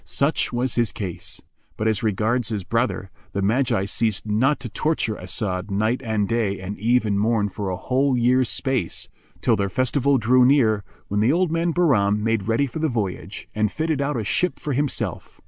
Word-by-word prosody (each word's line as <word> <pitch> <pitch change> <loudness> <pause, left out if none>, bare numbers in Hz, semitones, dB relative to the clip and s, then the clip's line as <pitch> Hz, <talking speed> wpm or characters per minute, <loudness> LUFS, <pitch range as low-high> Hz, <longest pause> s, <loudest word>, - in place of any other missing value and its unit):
Such 140 +3 0
was 125 +1 0
his 120 -3 +1
case; 100 -7 -6 0.3
but 110 - 0
as 110 -2 +1
regards 110 +2 0
his 105 -4 -3
brother, 115 -2 -1 0.2
the 100 - -1
Magi 110 -2 +1
ceased 105 -1 0
not 120 +8 +2
to 120 - -5
torture 115 -2 -1
As'ad 95 0 -2
night 110 +6 0
and 110 -3 0
day 110 -3 0
and 95 +2 -5
eve 120 +2 +2
and 100 -2 0
morn 105 -1 +1
for 100 +1 -4
a 90 - -2
whole 130 +4 +1
year's 125 +1 +3
space, 130 -10 -1 0.3
till - - +3
their 100 0 -1
festival 130 +5 +2
drew 125 +2 +4
near, 120 -6 +4 0.2
when 105 - -1
the 110 +5 +3
old 175 +1 +1
man 165 +1 +1
Bahram[FN#392] 130 - +3
made 110 -2 0
ready 115 +5 +2
for 140 +4 -6
the 160 0 +1
voyage 100 - -4
and 105 -1 0
fitted 160 -3 -1
out 140 -1 -1
a 110 - -2
ship 180 - 0
for 145 - -3
himself. 145 +1 -2
115 Hz, 195 wpm, -23 LUFS, 100-130 Hz, 0.3 s, drew